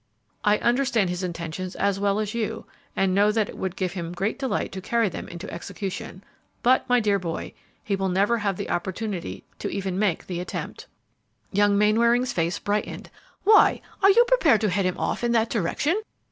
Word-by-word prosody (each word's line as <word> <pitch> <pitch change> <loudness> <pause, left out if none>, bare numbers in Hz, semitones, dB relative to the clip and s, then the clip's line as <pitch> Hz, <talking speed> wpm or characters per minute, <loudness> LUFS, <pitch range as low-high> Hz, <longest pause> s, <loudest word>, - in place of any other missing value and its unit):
"I 210 0 +4
understand 240 -6 +1
his 180 +1 -3
intentions 175 +1 -5
as 200 0 0
well 200 +1 +1
as 215 -1 -2
you, 225 -1 -3 0.3
and 195 -1 +2
know 205 +2 +4
that 215 -1 0
it - - -9
would 190 -1 -3
give 185 -2 -2
him 175 -2 -5
great 195 +8 -2
delight 265 -2 -1
to 190 - -6
carry 230 +1 +1
them - - -7
into 170 +2 -8
execution; 195 -1 -6 0.4
but, 255 +1 +3
my 245 0 +5
dear 205 -3 +2
boy, 170 -3 -5 0.3
he 200 - 0
will 195 0 -1
never 200 +6 +2
have 200 -3 -1
the - - -4
opportunity 175 - -3 0.2
to - - -3
even 190 -1 -3
make 200 -5 0
the 180 -2 -4
attempt." 180 - -6 0.6
Young 205 0 +3
Mainwaring's 235 +4 +3
face 170 +1 0
brightened. 210 0 -3 0.3
"Why, 425 +1 +6 0.2
are 390 - +7
you 470 +4 +6
prepared 325 - +4
to 215 - +2
head 195 +1 +1
him 180 - -2
off - - -2
in 240 0 +2
that 225 -1 +2
direction? 275 - 0
205 Hz, 190 wpm, -25 LUFS, 185-230 Hz, 0.6 s, are